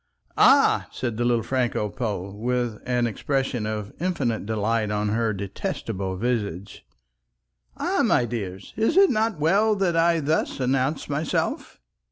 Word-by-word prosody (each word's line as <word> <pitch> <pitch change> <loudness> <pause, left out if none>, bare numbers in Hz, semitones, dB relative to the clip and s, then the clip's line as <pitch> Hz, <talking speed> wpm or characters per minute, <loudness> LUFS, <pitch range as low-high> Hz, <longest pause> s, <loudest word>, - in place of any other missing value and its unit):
"Ah," - - +5
said 120 -3 -3
the 120 - 0
little 120 -2 +2
Franco 125 -5 0
Pole, 105 -4 -4
with 120 0 -2
an 125 -1 +1
expression 125 0 -1
of 105 -1 -4
infinite 135 - -1
delight 110 0 0
on 105 0 -1
her 115 +1 +1
detestable 95 -1 -4
visage, 105 -5 -3 0.9
"ah, - - 0
my 120 - +3
dears, 100 -5 -6
is 225 +10 +1
it 390 -1 +6
not 220 -4 0
well 200 +8 +3
that 190 -4 0
I 165 0 +3
thus 155 -1 -1
announce 135 +3 0
myself?" 145 +2 -2
120 Hz, 140 wpm, -24 LUFS, 105-150 Hz, 0.9 s, it